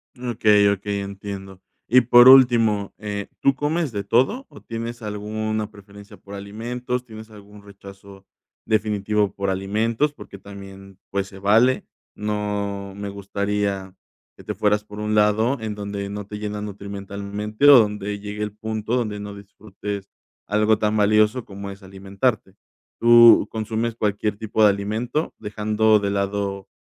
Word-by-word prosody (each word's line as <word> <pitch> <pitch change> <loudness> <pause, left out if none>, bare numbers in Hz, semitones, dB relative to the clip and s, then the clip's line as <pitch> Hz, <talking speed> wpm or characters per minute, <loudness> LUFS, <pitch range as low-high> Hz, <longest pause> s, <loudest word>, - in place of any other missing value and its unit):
Mm, 125 -1 -6
okey 105 -2 +4
okey, 100 0 -2
entiendo. 100 -1 -8 0.3
Y 125 +2 +6
por 120 +1 +7
último, 115 -6 +5
eh, 100 -1 -5
¿tú 135 - +3
comes 150 +1 -1
de 100 -2 -4
todo 130 - +1
o - - -14
tienes 115 +1 -6
alguna 110 0 -3
preferencia 100 -1 -15
por 100 0 -11
alimentos? 120 +5 -5
¿Tienes 110 -1 -11
algún 105 -1 -15
rechazo 100 -1 -14 0.4
definitivo 105 -1 0
por 100 -1 -2
alimentos? 110 +9 0
Porque 100 - -12
también, 95 -1 -12
pues, 100 0 -2
se 95 0 -13
vale. 115 +6 +3 0.3
No 100 -2 -3
me 100 0 -5
gustaría 100 -1 -3 0.4
que - - -14
te - - -5
fueras 105 0 +1
por 105 0 -11
un 105 0 -2
lado 110 +5 +2
en 110 -1 -4
donde 100 -1 -5
no 105 0 -6
te 105 +1 -8
llenan 105 0 -4
nutrimentalmente 100 +3 -3
o 140 -3 +10
donde 105 -1 -1
llegue 105 +1 -7
el 105 - -4
punto 110 +1 -3
donde 110 -4 -2
no 100 0 -7
disfrutes 100 0 -8 0.4
algo 105 +1 +2
tan 110 0 +1
valioso 105 +3 +3
como 100 0 -8
es 100 +1 -11
alimentarte, 95 +2 -3 0.4
¿tú 120 0 +7
consumes 110 +1 -2
cualquier 105 -1 -1
tipo 110 0 0
de 105 - +8
alimento?, 110 +9 -3
dejando 105 +1 +1
de 100 - -2
lado 100 0 -2
105 Hz, 150 wpm, -22 LUFS, 100-110 Hz, 0.4 s, o